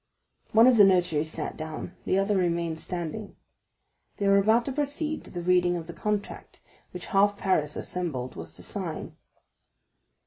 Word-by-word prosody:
One 225 +1 +7
of 250 -2 +6
the 205 - +9
notaries 175 -5 +3
sat - - -4
down, 160 +3 -6
the 185 - +2
other 195 +1 +2
remained 170 -3 0
standing. 180 +5 -5 0.8
They 200 - 0
were 200 0 +6
about 220 +4 +3
to 275 - -2
proceed 295 +2 -2
to - - -10
the 175 -1 -6
reading 180 0 +3
of 165 - -6
the 170 - -8
contract, 210 +1 -4 0.3
which - - -7
half 200 +1 +4
Paris 155 -7 0
assembled 145 -9 -4
was 80 0 -9
to - - -9
sign. - - -5
180 Hz, 165 wpm, -27 LUFS, 165-210 Hz, 0.8 s, the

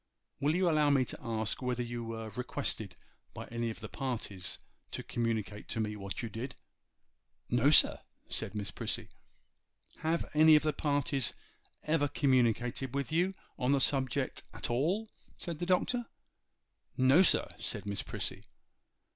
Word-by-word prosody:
Will 150 +3 +2
you 185 0 +3
allow 155 -3 +4
me 135 -2 +4
to - - -7
ask 110 -2 -1
whether 125 -1 -1
you 120 0 -4
were 115 -1 -5
requested 125 +4 -2 0.4
by - - -6
any 115 0 -2
of 110 - -7
the - - -5
parties 110 -8 -3 0.3
to - - -5
communicate 110 -3 -2
to - - -2
me 105 -1 -1
what 100 +2 -5
you - - -2
did?' 115 +5 -6 1.0
'No, 120 +3 +4
sir,' 155 - +7 0.3
said - - -3
Miss 100 -3 -3
Prissy. - - -3 0.9
'Have 165 +1 0
any 155 +1 +8
of 150 - +4
the 155 -1 +1
parties 140 -3 +1 0.5
ever 155 -2 +2
communicated 125 -1 +1
with 140 +2 -2
you 180 +4 +2 0.2
on 130 +1 +2
the 140 - +3
subject 130 -2 0
at - - -3
all?' 180 - 0 0.3
said 170 -4 -5
the 175 - -2
Doctor. 230 +6 +1 0.9
'No, 130 +6 +6
sir,' 190 - +4
said - - -3
Miss 100 0 -2
Prissy. - - -4
130 Hz, 155 wpm, -32 LUFS, 115-150 Hz, 1.0 s, any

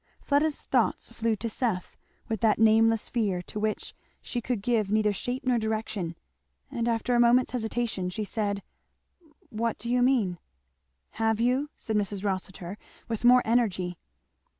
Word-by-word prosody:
Fleda's 290 +1 +1
thoughts - - 0
flew 230 -1 0
to 230 - -4
Seth, 220 -5 -2 0.3
with 220 -4 -3
that 220 -2 +4
nameless 225 0 +4
fear 205 -7 0
to 210 - -6
which 215 0 -2 0.3
she 240 - -4
could 235 -3 -2
give 220 -4 +1
neither 210 0 +2
shape 245 +6 -3
nor 250 -2 +3
direction, 215 -6 -2 0.6
and 235 0 -1
after 235 +1 0
a 240 - +4
moment's 240 +2 +4
hesitation 225 -5 -2
she 210 +4 -3
said, 205 -1 -2 0.9
"What 230 +1 -1
do 235 - -4
you 250 0 +3
mean?" 230 -9 +2 0.8
"Have 225 -1 +2
you?" 255 +5 +1
said 220 -1 -2
Mrs. 200 -1 -2
Rossitur 190 0 -4 0.3
with 230 0 -3
more 250 +1 +7
energy. 190 -7 +1
225 Hz, 150 wpm, -28 LUFS, 205-240 Hz, 0.9 s, more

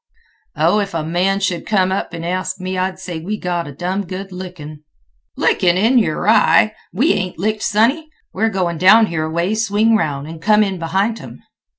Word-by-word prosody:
"Oh, 165 +7 +2
if 200 -4 -3
a 160 - -1
man 180 +5 0
should 180 -3 -2
come 190 -3 +2
up 190 - -2
an' 165 -1 -7
ask 185 +2 -3
me, 185 0 -4
I'd 185 0 -2
say 180 -3 -6
we 200 +6 -4
got 175 -4 -3
a - - -7
dum 180 +6 -3
good 190 +2 -7
lickin'." 175 -5 -9 0.6
"Lickin'—in 195 +8 +3
yer 170 -6 -1
eye! 215 0 +4 0.2
We 265 - +2
ain't 185 -1 -3
licked, 215 +4 -1
sonny. 260 +10 +1 0.2
We're 225 +1 +1
goin' 180 -5 -2
down 215 +5 +6
here 160 -5 -3
aways, 180 +8 -1
swing 220 +3 +2
aroun', 145 -7 -1
an' 160 +1 -9
come 210 +4 +3
in 195 -3 -3
behint 195 +7 -1
'em." - - -11
185 Hz, 190 wpm, -18 LUFS, 170-210 Hz, 0.6 s, down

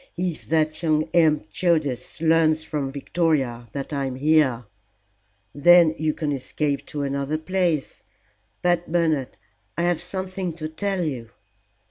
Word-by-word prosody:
"If 175 -2 -3
that 155 0 +1
young 155 -2 +2
imp 155 -10 +3
Judas 155 - 0
learns 160 -1 +3
from 145 -4 -3
Victoria 135 -5 -1
that 140 +1 -5
I 140 -1 -1
am 130 -1 -4
here 135 -4 +2 0.5
" 100 +1 -44
"Then 170 +2 +6
you 155 -1 0
can 150 -3 -2
escape 140 +1 -2
to 145 -1 -4
another 140 +2 -1
place. 170 -3 -1 0.6
But, 175 -2 +1
Bernard, 160 -7 0 0.4
I 170 - 0
have 175 -2 +1
something 185 0 -4
to 155 -1 -5
tell 195 +3 -2
you." 125 -8 -4
155 Hz, 140 wpm, -23 LUFS, 140-170 Hz, 0.6 s, Then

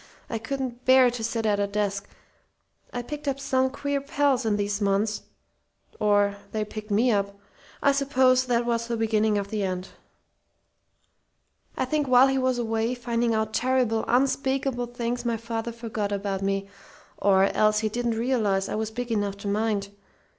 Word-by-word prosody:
I 225 - -2
couldn't 250 +1 -4
bear 260 -1 +6
to 235 -2 -5
sit 225 0 -2
at 205 -1 +2
a 200 - +1
desk. 200 -1 -2 0.8
I 245 - -4
picked 295 +3 -7
up 275 -1 -1
some 260 -1 +1
queer 285 +1 -2
pals 280 -3 +1
in 210 -1 +2
those 205 0 -2
months 205 +2 +1 0.8
or 205 -1 +2 0.2
they 215 -1 -1
picked 215 0 -8
me 225 +5 +3
up. 200 -1 -1 0.5
I 280 - +5
suppose 260 -2 +3
that 240 -1 +1
was 235 -1 -1
the 235 -1 -2
beginning 220 -1 +2
of 200 -1 -3
the 215 0 -2
end. 185 -1 -3 1.9
"I - - +1
think 295 +2 0
while 255 +1 +6
he 270 0 +1
was 255 -1 +1
away, 225 +1 -1
finding 235 -1 0
out 220 0 -1
terrible, 250 -3 +1
unspeakable 265 -1 +1
things, 240 0 -3
my 235 -1 0
father 230 +1 -4
forgot 225 -3 -4
about 200 -1 -2
me 195 0 -1 0.5
or 195 -1 +4
else 215 +2 +3
he 220 - +1
didn't 235 0 -1
realize 215 -6 +1
I - - -3
was 220 0 -2
big 240 +2 -5
enough 205 -2 -1
to 200 - -7
mind. 205 -1 0
230 Hz, 170 wpm, -26 LUFS, 205-255 Hz, 1.9 s, bear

